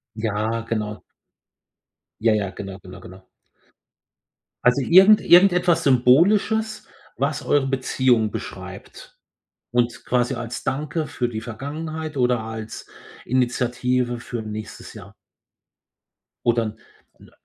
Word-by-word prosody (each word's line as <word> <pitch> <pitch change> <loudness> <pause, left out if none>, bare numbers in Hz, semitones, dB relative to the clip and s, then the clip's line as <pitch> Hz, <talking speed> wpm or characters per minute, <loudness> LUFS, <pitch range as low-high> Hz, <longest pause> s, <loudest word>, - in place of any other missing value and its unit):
Ja, 110 +1 -2
genau. 105 -2 -3 1.2
Ja, 110 0 +3
ja, 100 -2 -1
genau, 95 0 -8
genau, 90 0 -12
genau. 95 +1 -13 1.4
Also 125 +3 +4
irgend 190 +8 +7
irgendetwas 175 -2 +5
Symbolisches, 195 - +3 0.3
was 140 +1 -1
eure 140 -2 +2
Beziehung 130 -4 +1
beschreibt - - -9 0.6
und 120 -1 -1
quasi 125 +1 +1
als 120 +1 -6
Danke 150 +3 -2
für 120 - -2
die 110 -2 -5
Vergangenheit 155 +7 -6
oder 125 -2 +2
als 110 0 -7 0.4
Initiative 125 0 0
für 120 -2 -6
nächstes 110 0 -8
Jahr. - - -12 1.3
Oder 120 -1 +3
'n 110 0 -6 0.4
'n - - -18
äh, - - -20
125 Hz, 110 wpm, -22 LUFS, 110-145 Hz, 1.4 s, irgend